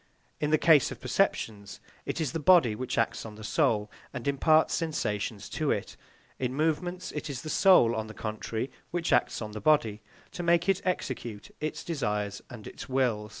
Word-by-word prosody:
In 150 - 0
the 155 - +4
case 155 -4 +5
of - - -8
perceptions, 100 -2 -1 0.3
it - - -2
is 155 -6 -1
the 165 - -3
body 160 -8 +5
which 125 +4 -4
acts - - 0
on 110 -2 -9
the 110 - -11
soul 105 0 +1 0.2
and 125 -2 -6
imparts 155 +3 +3
sensations 110 - -2
to - - -1
it; - - -2 0.4
in 130 0 -2
movements, 175 +4 -1
it 150 - -5
is 130 -4 -5
the 155 - -4
soul, 150 - +5
on 110 0 -3
the 110 - -10
contrary, 110 +3 -4 0.2
which 170 -1 -1
acts 120 -1 +1
on 105 - -6
the 105 0 -7
body, 115 -9 +2 0.3
to - - -5
make 170 +1 +3
it 195 0 +2
execute 120 - -3
its 155 0 -4
desires 105 -10 -2
and 115 -4 -10
its - - -9
will. 120 -5 0
130 Hz, 190 wpm, -29 LUFS, 110-160 Hz, 0.4 s, case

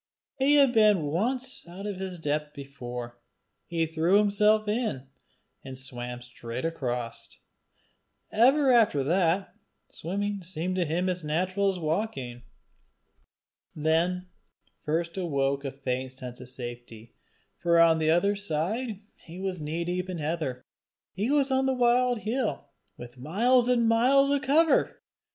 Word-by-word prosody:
He 280 +2 +4
had 275 -4 +5
been 210 -6 +5
once 245 - -2
out 185 +4 -9
of 205 -2 -4
his 190 -1 -5
depth 150 -1 -2
before: 125 -4 -7 0.5
he 165 -1 0
threw 165 +4 +2
himself 210 +1 +3
in, 210 - -1 0.6
and 130 -1 -8
swam 125 -2 -6
straight 125 +1 -6
across: 125 -7 -3 1.0
ever 265 +5 +4
after 215 - +4
that, 175 +4 +1 0.4
swimming 200 +4 -3
seemed 180 +1 -4
to 180 - +1
him 170 +4 -1
as 180 -2 -2
natural 185 +6 0
as 190 - -2
walking. 155 - -3 1.3
Then 165 +4 +1 0.6
first 170 +3 -2
awoke 140 -6 0
a 135 - -3
faint 130 -1 -4
sense 125 -1 -9
of 125 - -8
safety; 120 -2 -9 0.5
for 170 -1 +3
on 165 -1 +5
the 155 0 +1
other 200 +5 +3
side 200 +5 -2 0.2
he 170 +2 -10
was 190 -3 -3
knee 160 +3 -3
deep 180 +1 -2
in 180 - -4
heather. 150 -5 -3 0.5
He 205 +6 -2
was 280 -1 +2
on 265 0 +2
the 265 - +1
wild 245 -1 +2
hill, 215 - -2 0.3
with 120 +1 -11
miles 235 - +2
on 235 -2 +3
miles 265 +5 +4
of 285 -1 +1
cover! 310 +4 +3
175 Hz, 140 wpm, -27 LUFS, 140-215 Hz, 1.3 s, had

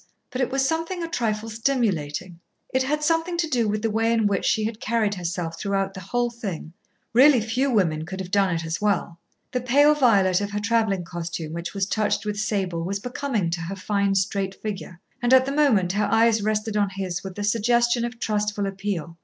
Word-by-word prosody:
But 255 - -2
it 255 - +1
was 270 0 +1
something 330 +3 -2
a - - -2
trifle 225 -7 -2
stimulating. 195 - -1 0.3
It 260 - +3
had 300 +3 -1
something 330 +2 +1
to 335 -1 +1
do 245 -7 +1
with 210 +1 -1
the 225 - +1
way 225 +1 +1
in 225 -2 +2
which 200 -2 +1
she 220 - +2
had 220 0 -3
carried 220 -2 0
herself 175 -2 -4
throughout 195 -1 -1
the 190 - -7
whole 240 +6 -1
thing. 195 -9 -6 0.4
Really 260 +2 +7
few 235 +5 0
women 170 -10 +1
could 190 +1 -6
have 185 -1 -6
done 200 -2 +3
it 165 0 -3
as 160 +3 -3
well. 185 -5 0 0.3
The 250 - -1
pale 285 +5 +5
violet 200 -9 +3
of 205 - -2
her 205 0 -3
travelling 220 -4 +1
costume 170 -2 -5
which 170 +3 -5
was 195 -1 +1
touched 210 +1 0
with 210 -1 -2
sable 190 -5 -1
was 195 +3 -2
becoming 245 -6 -2
to 170 0 -2
her 175 +4 -4
fine, 200 0 0
straight 195 0 -1
figure. 195 -4 -6 0.2
And 245 +1 +5
at 260 0 +5
the 275 - -2
moment 250 -12 +3
her 205 +2 +1
eyes 225 -1 +4
rested 215 +1 -1
on 205 -1 +2
his 190 -2 -4
with 190 -1 -7
the 205 - -4
suggestion 235 +3 +2
of 240 0 -4
trustful 210 -2 -1
appeal. 195 -4 -4
210 Hz, 210 wpm, -24 LUFS, 190-240 Hz, 0.4 s, Really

